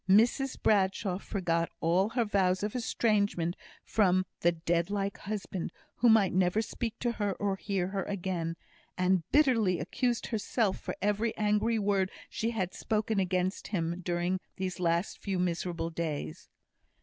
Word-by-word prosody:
Mrs 240 +7 +4
Bradshaw 190 -2 +2
forgot 170 -5 -1
all 180 +5 +2
her 235 0 +1
vows 190 -2 +2
of 210 +2 -2
estrangement 205 -7 +1 0.3
from 185 -3 +3
the 175 - +4
dead 170 +1 0
like 200 -1 -2
husband, 195 -4 -4 0.3
who 240 - +5
might 215 -4 +5
never 185 +2 +3
speak 225 +1 -3
to 240 - +1
her, 205 -4 -1
or 200 0 -1
hear 195 -2 -2
her 195 0 -2
again, 175 -4 -2 0.4
and 185 0 +3
bitterly 230 - +4
accused 245 -2 -1
herself 220 -2 0
for - - -5
every 210 +2 +1
angry 210 +2 +2
word 200 -2 +1 0.2
she 225 - -1
had 190 -6 -2
spoken 215 -1 0
against 185 0 0
him 170 -3 -2
during 175 +1 0 0.2
these 185 -1 -3
last 170 +1 0
few 195 -2 -2
miserable 170 -1 -1
days. 160 -3 -4
195 Hz, 150 wpm, -30 LUFS, 180-215 Hz, 0.4 s, who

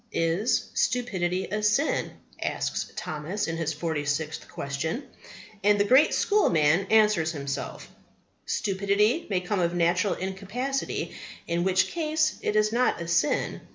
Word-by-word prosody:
Is 165 +8 0
stupidity 190 -7 0
a 210 +1 -1
sin? 210 +9 +1 0.3
asks - - -2
Thomas 155 +7 -3
in 165 0 -3
his 160 -1 -1
Forty 160 -1 -2
Sixth 150 +2 -3
Question. 155 - -3 0.6
And 205 0 +4
the - - +5
great 260 +8 +5
schoolman 175 - +3
answers 210 -7 +4
himself, 140 -2 -5 0.6
"Stupidity 200 - +1
may 185 -3 0
come 185 +2 -1
of 170 0 0
natural 175 +3 +2
incapacity, 200 +9 -3 0.3
in 170 0 -1
which 190 0 +2
case 310 -1 0
it - - -1
is 215 0 +3
not 250 +1 +2
a 170 - -5
sin. 170 - +1
190 Hz, 135 wpm, -26 LUFS, 165-215 Hz, 0.6 s, the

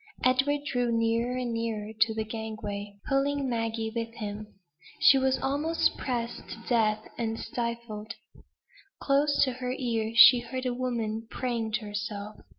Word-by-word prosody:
Edward 265 +3 +3
drew 245 -4 0
nearer 230 +2 +1
and 245 -2 -2
nearer 225 -2 -3
to 220 +1 +2
the 220 - -1
gangway, 215 -2 -5
pulling 275 0 +1
Maggie 225 -2 -2
with 230 0 -3
him. 210 -1 -5 0.5
She 270 - +7
was 265 0 +2
almost 295 +5 +1
pressed 240 -2 -4
to 225 - -8
death, 220 -3 +2
and 225 -1 -2
stifled. 235 -3 -4 0.8
Close 285 +1 +3
in 260 - -2
her 250 0 -3
ear, 225 -3 -1
she 240 +1 +10
heard 255 +2 -5
a 250 - 0
woman 230 -3 -2
praying 235 -4 -2
to 220 - 0
herself. 205 0 -5
230 Hz, 150 wpm, -28 LUFS, 220-255 Hz, 0.8 s, she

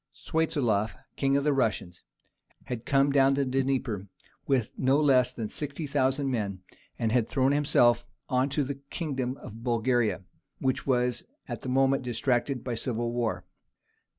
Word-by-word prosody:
Swiatoslaf, 130 -10 0 0.2
king 135 0 +2
of 140 - 0
the 150 0 +3
Russians, 110 -9 -1 0.6
had 120 -2 -6
come 140 0 +3
down 135 -1 +4
the 140 0 +1
Dnieper 130 -6 -1 0.4
with 130 -5 +1
no 135 +2 +3
less 130 -4 +4
than 115 -4 -4
60,000 140 0 -1
men, 100 -7 -2 0.3
and 115 -1 0
had 120 -2 +2
thrown 135 0 +2
himself 120 -5 +4 0.2
on 130 +2 +1
to 145 +1 0
the 140 +1 -5
kingdom 135 -5 -3
of 115 +2 -10
Bulgaria, 120 -3 +1 0.3
which 130 +1 -1
was 125 -2 +1 0.2
at - - -5
the 130 - -5
moment 135 +1 +3
distracted 125 +1 0
by 125 - -3
civil 120 0 -2
war. 120 -2 -2
130 Hz, 150 wpm, -28 LUFS, 120-140 Hz, 0.6 s, down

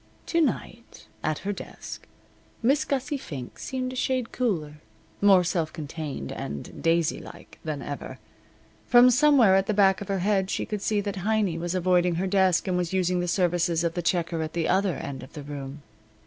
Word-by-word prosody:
To 335 - +1
night 240 -5 -3 0.2
at 155 -1 0
her 205 - 0
desk - - -9 0.6
Miss 275 +5 +3
Gussie 275 +1 -1
Fink 135 - -8
seemed 255 -1 -3
a - - -7
shade 255 -2 -1
cooler, 155 -11 -2 0.4
more 195 -3 +6
self 170 -2 -1
contained, 150 - -6
and 70 0 -6
daisylike 165 -1 -1
than 150 -3 -4
ever. 145 - -6 0.7
From 245 +1 +7
somewhere 255 -6 +5
at 195 +1 +2
the 215 - 0
back 195 -1 +4
of 200 - -6
her 195 - 0
head 195 -2 +2
she - - -1
could 210 -2 -4
see 210 0 +1
that 200 -1 -4
Heiny 200 -3 0
was 175 +2 -2
avoiding 180 -1 +2
her 180 +3 -1
desk 190 -1 +2
and 185 - +1
was 180 0 -2
using 180 -1 +1
the 175 - -1
services 175 -2 +1
of 170 -1 0
the 175 - -2
checker 170 -1 0
at 155 0 -4
the 170 -1 0
other 190 -2 +2
end 135 -1 -6
of 130 - -12
the 150 - -7
room. 140 0 -7
180 Hz, 190 wpm, -26 LUFS, 165-205 Hz, 0.7 s, From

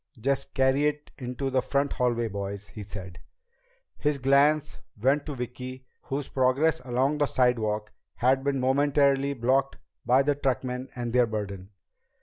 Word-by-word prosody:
"Just 135 +4 -1
carry 135 +2 +3
it 150 0 -4
into 130 +1 -3
the 130 0 +2
front 140 +2 0
hallway, 120 -2 0
boys," 100 -1 -5
he 105 - -9
said. 95 -3 -8 0.8
His 150 -1 +1
glance 140 +3 +3 0.2
went 140 +6 +2
to 145 - -4
Vicki, 130 +1 -6 0.2
whose 135 +1 -3
progress 135 +5 +2
along 130 +4 0
the 145 - +3
sidewalk 110 -5 +1 0.2
had 130 +2 +2
been 140 -1 0
momentarily 140 +1 +2
blocked 135 +3 +1 0.3
by 130 +3 +4
the 145 +1 +2
truckmen 130 -2 -2
and 120 -1 -3
their 125 -1 +4
burden. 100 -3 -5
130 Hz, 145 wpm, -27 LUFS, 120-140 Hz, 0.8 s, by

